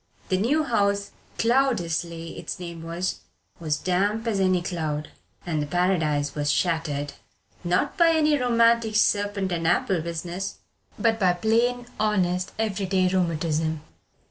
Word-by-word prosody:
The 185 Hz, -, +2 dB
new 285 Hz, +10 st, +2 dB
house 200 Hz, -6 st, 0 dB, 0.3 s
"Cloudesley" 175 Hz, -10 st, 0 dB
its -, -, -6 dB
name 170 Hz, -2 st, -7 dB
was 170 Hz, +3 st, -3 dB, 0.4 s
was 155 Hz, -3 st, -1 dB
damp 200 Hz, +6 st, 0 dB
as 220 Hz, -4 st, 0 dB
any 185 Hz, -2 st, +2 dB
cloud, 155 Hz, -4 st, -3 dB, 0.3 s
and 155 Hz, -3 st, -1 dB
the 145 Hz, -, -3 dB
Paradise 155 Hz, -4 st, +1 dB
was 145 Hz, -1 st, 0 dB
shattered, 155 Hz, -4 st, -1 dB, 0.5 s
not 175 Hz, -, 0 dB
by 340 Hz, -2 st, +6 dB
any 310 Hz, -2 st, +3 dB
romantic 235 Hz, -3 st, +3 dB
serpent 205 Hz, -2 st, +1 dB
and 165 Hz, -1 st, -1 dB
apple 175 Hz, +1 st, +2 dB
business, 170 Hz, +4 st, -4 dB, 0.4 s
but 225 Hz, +1 st, +1 dB
by 185 Hz, -3 st, +4 dB
plain, 235 Hz, +6 st, +1 dB
honest, 185 Hz, -4 st, +1 dB
every 205 Hz, -3 st, -1 dB
day 185 Hz, -1 st, +2 dB
rheumatism. 160 Hz, -3 st, 0 dB
185 Hz, 135 wpm, -25 LUFS, 165-215 Hz, 0.5 s, by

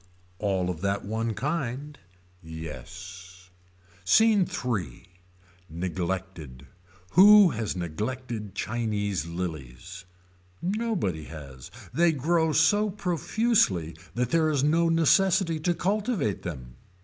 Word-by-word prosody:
All 95 Hz, -3 st, 0 dB
of 85 Hz, -2 st, -8 dB
that 100 Hz, 0 st, -1 dB
one 110 Hz, +1 st, -2 dB
kind. 145 Hz, 0 st, -3 dB, 0.4 s
Yes. 90 Hz, +3 st, -10 dB, 0.5 s
SCENE 210 Hz, -, +4 dB
III. 100 Hz, -, -3 dB, 0.6 s
Neglected. 85 Hz, -5 st, -5 dB, 0.5 s
Who 200 Hz, 0 st, +8 dB
has 110 Hz, -5 st, -3 dB
neglected 105 Hz, +5 st, -5 dB
Chinese 105 Hz, -7 st, -2 dB
lillies. 85 Hz, -1 st, -6 dB, 0.5 s
Nobody 180 Hz, -, -2 dB
has. 70 Hz, -5 st, -10 dB, 0.2 s
They 170 Hz, 0 st, +3 dB
grow 160 Hz, +3 st, +1 dB
so 210 Hz, +6 st, +3 dB
profusely 180 Hz, -, 0 dB, 0.2 s
that 125 Hz, 0 st, -1 dB
there 160 Hz, -1 st, +3 dB
is 145 Hz, -3 st, +1 dB
no 165 Hz, +3 st, +3 dB
necessity 165 Hz, +1 st, +3 dB
to 175 Hz, +3 st, 0 dB
cultivate 200 Hz, -, -1 dB
them. 65 Hz, -8 st, -8 dB
110 Hz, 100 wpm, -27 LUFS, -, 0.6 s, Who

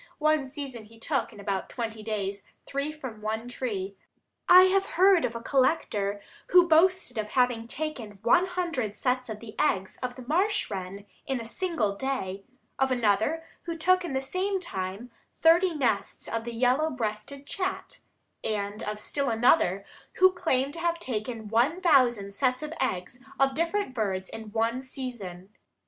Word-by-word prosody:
One 305 Hz, -2 st, +2 dB
season 265 Hz, -5 st, -7 dB
he 225 Hz, +2 st, -17 dB
took, 270 Hz, +4 st, -1 dB
in -, -, -13 dB
about 195 Hz, -1 st, -2 dB
twenty 225 Hz, -3 st, -4 dB
days, 200 Hz, -2 st, -3 dB, 0.2 s
three 280 Hz, +2 st, -2 dB
from 260 Hz, -8 st, -8 dB
one 220 Hz, +2 st, -3 dB
tree. 205 Hz, -6 st, -4 dB, 0.5 s
I 365 Hz, +1 st, +10 dB
have 385 Hz, +1 st, +3 dB
heard 375 Hz, -1 st, +6 dB
of 230 Hz, -, -3 dB
a 230 Hz, -, -4 dB
collector 230 Hz, -8 st, +1 dB, 0.3 s
who 360 Hz, -1 st, +6 dB
boasted 345 Hz, -4 st, +3 dB
of 215 Hz, -, -2 dB
having 245 Hz, -1 st, +1 dB
taken 240 Hz, -8 st, -5 dB
one 345 Hz, +11 st, +4 dB
hundred 335 Hz, -, -2 dB
sets 255 Hz, -1 st, 0 dB
of 215 Hz, -1 st, -5 dB
the 220 Hz, -2 st, -9 dB
eggs 190 Hz, -11 st, 0 dB
of 250 Hz, -1 st, -3 dB
the 255 Hz, -, -9 dB
marsh 375 Hz, -, +1 dB
wren, 195 Hz, +1 st, -5 dB, 0.2 s
in 265 Hz, -2 st, -1 dB
a 230 Hz, -, -6 dB
single 235 Hz, -, -1 dB
day; 200 Hz, -6 st, -3 dB, 0.4 s
of 265 Hz, 0 st, +3 dB
another, 240 Hz, +6 st, +1 dB, 0.2 s
who 335 Hz, -1 st, -4 dB
took 370 Hz, +3 st, +3 dB
in 335 Hz, -6 st, -4 dB
the 265 Hz, -, 0 dB
same 375 Hz, +8 st, -1 dB
time, 195 Hz, -, -5 dB, 0.2 s
thirty 340 Hz, +3 st, +5 dB
nests 240 Hz, -8 st, -1 dB
of 230 Hz, 0 st, -3 dB
the 235 Hz, -1 st, -5 dB
yellow 255 Hz, +6 st, +3 dB
breasted 245 Hz, +2 st, -4 dB
chat; 385 Hz, +8 st, -4 dB, 0.4 s
and 205 Hz, -1 st, -2 dB
of 210 Hz, 0 st, -3 dB
still 280 Hz, +5 st, -1 dB
another, 225 Hz, -, +3 dB, 0.3 s
who 375 Hz, 0 st, +6 dB
claimed 280 Hz, -6 st, 0 dB
to 335 Hz, -, -6 dB
have 340 Hz, 0 st, 0 dB
taken 225 Hz, -5 st, -4 dB
one 240 Hz, -, +2 dB
thousand 245 Hz, -, +3 dB
sets 255 Hz, +4 st, 0 dB
of 305 Hz, +1 st, -5 dB
eggs 245 Hz, +1 st, -2 dB, 0.2 s
of 270 Hz, 0 st, +4 dB
different 335 Hz, +1 st, -1 dB
birds 195 Hz, -5 st, -2 dB
in 220 Hz, -1 st, -8 dB
one 230 Hz, +3 st, 0 dB
season. 235 Hz, -9 st, -7 dB
250 Hz, 165 wpm, -28 LUFS, 215-315 Hz, 0.5 s, I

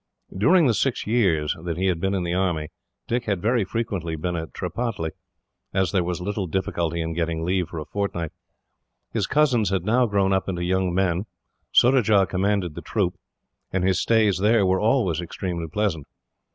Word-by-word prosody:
During 165 Hz, -, +4 dB
the 120 Hz, -, +4 dB
six 130 Hz, +3 st, 0 dB
years 95 Hz, -10 st, +2 dB
that 85 Hz, -2 st, -3 dB
he 95 Hz, -, 0 dB
had 90 Hz, -3 st, +1 dB
been 95 Hz, +2 st, 0 dB
in 95 Hz, -, -1 dB
the 85 Hz, 0 st, -2 dB
army, 85 Hz, -5 st, 0 dB, 0.4 s
Dick 120 Hz, +1 st, -1 dB
had 100 Hz, -4 st, 0 dB
very 115 Hz, +3 st, +2 dB
frequently 95 Hz, -6 st, -3 dB
been 85 Hz, +3 st, -3 dB
at 80 Hz, -1 st, -5 dB
Tripataly, 90 Hz, -2 st, -3 dB, 0.6 s
as 95 Hz, -3 st, +2 dB
there 90 Hz, -, +2 dB
was 90 Hz, 0 st, -3 dB
little 100 Hz, +1 st, -3 dB
difficulty 85 Hz, -2 st, -1 dB
in 80 Hz, 0 st, -3 dB
getting 80 Hz, -1 st, -2 dB
leave 90 Hz, -1 st, 0 dB
for 85 Hz, -, -7 dB
a 75 Hz, -, -4 dB
fortnight. 85 Hz, -5 st, -3 dB, 0.8 s
His -, -, 0 dB
cousins 130 Hz, -7 st, +3 dB
had 95 Hz, -2 st, -1 dB
now 120 Hz, +3 st, +3 dB
grown 100 Hz, -2 st, +2 dB
up 95 Hz, 0 st, 0 dB
into 90 Hz, -2 st, -2 dB
young 95 Hz, 0 st, +1 dB
men, 90 Hz, +2 st, 0 dB, 0.4 s
Surajah 110 Hz, -6 st, +5 dB
commanded 95 Hz, -2 st, 0 dB
the -, -, -7 dB
troop, -, -, -1 dB, 0.6 s
and 95 Hz, -1 st, 0 dB
his 95 Hz, 0 st, +2 dB
stays 110 Hz, -5 st, +3 dB
there 105 Hz, +1 st, +4 dB
were 95 Hz, 0 st, +2 dB
always 105 Hz, -, +2 dB
extremely 85 Hz, -1 st, -4 dB
pleasant. 85 Hz, -5 st, -1 dB
95 Hz, 180 wpm, -24 LUFS, 85-105 Hz, 0.8 s, Surajah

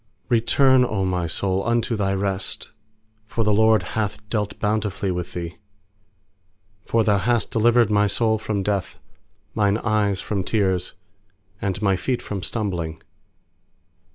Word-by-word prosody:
7Return, 130 Hz, +3 st, +4 dB
O 105 Hz, -6 st, -1 dB
my 90 Hz, -2 st, -1 dB
soul, 95 Hz, +3 st, 0 dB
unto 120 Hz, 0 st, 0 dB
thy 100 Hz, -2 st, 0 dB
rest; 95 Hz, -1 st, -2 dB, 0.6 s
For 115 Hz, -, -1 dB
the 105 Hz, -1 st, +2 dB
LORD 110 Hz, -1 st, +4 dB
hath 105 Hz, -1 st, -3 dB
dealt 105 Hz, -2 st, -1 dB
bountifully 105 Hz, -2 st, -1 dB
with 90 Hz, -1 st, -4 dB
thee. 85 Hz, -1 st, -5 dB, 1.3 s
8For 115 Hz, -1 st, +2 dB
Thou 105 Hz, -2 st, +3 dB
hast 120 Hz, -1 st, 0 dB
delivered 115 Hz, 0 st, +3 dB
my 105 Hz, 0 st, +3 dB
soul 110 Hz, +2 st, +1 dB
from 105 Hz, -2 st, -2 dB
death, 100 Hz, -1 st, -2 dB, 0.6 s
Mine 100 Hz, -1 st, +2 dB
eyes 105 Hz, -4 st, 0 dB
from 100 Hz, -3 st, -2 dB
tears, 95 Hz, -4 st, 0 dB, 0.7 s
And 95 Hz, -3 st, -2 dB
my 100 Hz, -2 st, +3 dB
feet 120 Hz, +7 st, -2 dB
from 100 Hz, -2 st, -4 dB
stumbling. 90 Hz, -6 st, -2 dB
105 Hz, 135 wpm, -23 LUFS, 95-110 Hz, 1.3 s, 7Return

